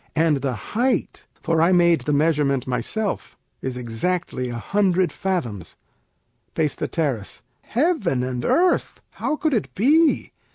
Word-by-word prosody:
And 160 -2 +3
the 135 -2 -2 0.2
height 250 +4 0 0.2
(for 165 -1 +2
I 170 +3 +4
made 170 -4 +4
the 150 - -2
measurement 145 -3 +2
myself) 130 - -3 0.2
Is 130 -1 -4
exactly 125 +3 -2
a 120 - -5
hundred 185 +2 +1
fathoms. 135 - -3 0.8
Peis. 145 - -2 0.2
Heaven 270 - 0
and 125 -1 -3
earth! 355 - +1
How - - -2
could 305 -1 0
it 140 - -1
be? 305 - +3
160 Hz, 125 wpm, -22 LUFS, 130-200 Hz, 0.8 s, I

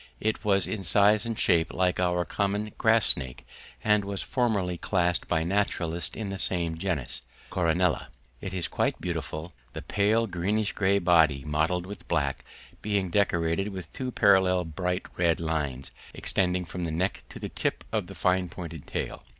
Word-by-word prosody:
It 110 +1 -1
was 100 -3 +4
in 105 - -3
size 105 +4 +4
and 115 -2 -3
shape 85 -3 +3
like 90 -1 +1
our 90 -1 +1
common 100 +5 -1
grass 115 -1 +4
snake, 65 -2 0 0.4
and 105 -1 +3
was 100 -1 -3
formerly 105 -8 0
classed 90 -3 0
by 80 -2 +1
naturalists 85 -2 0
in 110 -3 -4
the 95 -1 -4
same 85 -4 0
genus, 75 -9 -3 0.3
Coronella. 90 0 +1 0.3
It 95 - -5
is 90 -2 -2
quite - - -1
beautiful, 80 +3 -4 0.2
the - - -6
pale 105 +3 +2
greenish 105 +3 -1
grey 100 0 +2
body, 80 -7 +4
mottled 80 +4 0
with 100 +2 -9
black, 70 -5 0 0.4
being 100 -4 -1
decorated 85 -1 +1
with 95 -5 -7
two 130 -1 -3
parallel 95 -5 +4
bright 90 +3 -2
red 85 -2 +2
lines 75 -5 -2 0.2
extending 90 -1 0
from 90 +1 -5
the 85 - -1
neck 90 +5 -1
to - - -9
the - - -5
tip - - -2
of - - -1
the - - -10
fine 90 -1 +1
pointed 85 -3 -8
tail. - - -4
90 Hz, 165 wpm, -27 LUFS, 85-100 Hz, 0.4 s, was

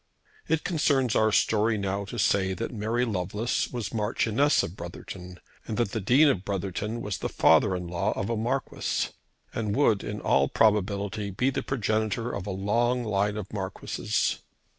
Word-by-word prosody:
It 160 - +1
concerns 145 - +1
our 110 0 +4
story 110 +1 +2
now 100 0 -2
to 120 - -7
say 95 -2 +2
that 90 - -4
Mary 115 +3 0
Lovelace 105 +2 -1
was 120 -5 -4
Marchioness 115 +5 +2
of 85 - -5
Brotherton, 90 -2 -8 0.3
and 110 - -3
that 120 -5 0
the 110 - -2
Dean 130 +10 +5
of 115 -10 +1
Brotherton 100 +3 -3
was 105 -4 -3
the - - -2
father 95 - +4
in 90 -1 -4
law 85 0 -1
of 95 - -3
a 115 - -1
Marquis, 125 +5 -1 0.4
and 110 -3 -2
would, 115 -8 +3
in 105 0 -4
all 70 0 +3
probability, 100 -1 +1
be 125 +8 0
the - - -2
progenitor 110 -1 -1
of 100 0 -5
a - - -2
long 115 +6 +1
line 105 -1 0
of 105 -1 -6
Marquises. 95 -2 -1
105 Hz, 170 wpm, -27 LUFS, 100-120 Hz, 0.4 s, Dean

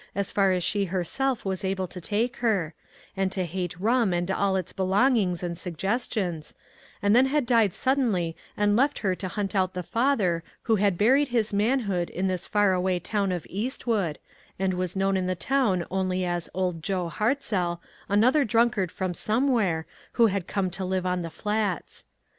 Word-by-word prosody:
as 200 -1 -1
far 195 -2 +3
as 180 -1 0
she 200 +3 +1
herself 200 +8 -1
was 190 -1 -2
able 190 -1 -1
to 180 0 -9
take 225 +7 -1
her, 200 -9 0 0.4
and 195 -1 0
to 190 -1 -1
hate 175 0 -4
rum 225 -1 +2
and 175 +2 -1
all 195 0 +1
its 185 -1 -3
belongings 195 -1 +2
and 170 -1 -3
suggestions, 185 - -2 0.5
and 205 +2 +4
then 255 +2 +6
had 290 -1 +1
died 230 -5 +3
suddenly 215 -11 0 0.2
and 205 0 +3
left 275 +5 +2
her 190 - +3
to 185 +1 -5
hunt 200 +2 -3
out 185 -2 +1
the 180 - -3
father 210 -7 +1 0.2
who 225 -2 +2
had 200 -3 +2
buried 265 +8 +4
his 230 -4 0
manhood 205 -5 +1
in 190 +2 -2
this 185 -1 -2
far 205 -2 +3
away 180 0 +1
town 200 +2 -1
of 175 -3 -3
Eastwood, 210 - -2 0.4
and 190 0 0
was 180 0 -3
known 195 0 +1
in 185 -1 0
the 185 - 0
town 205 -6 +1
only 185 -1 0
as 175 -1 -2
Old 180 -3 -2
Joe 180 +1 -1
Hartzell, 200 -5 -1 0.3
another 245 +9 +4
drunkard 225 -6 +2
from 185 -2 -3
somewhere, 215 -7 +1 0.3
who 235 - +5
had 195 -4 0
come 190 -3 -1
to 190 +2 -4
live 185 0 -1
on 180 0 0
the 165 - -4
Flats. 210 0 -3
195 Hz, 180 wpm, -26 LUFS, 180-220 Hz, 0.5 s, then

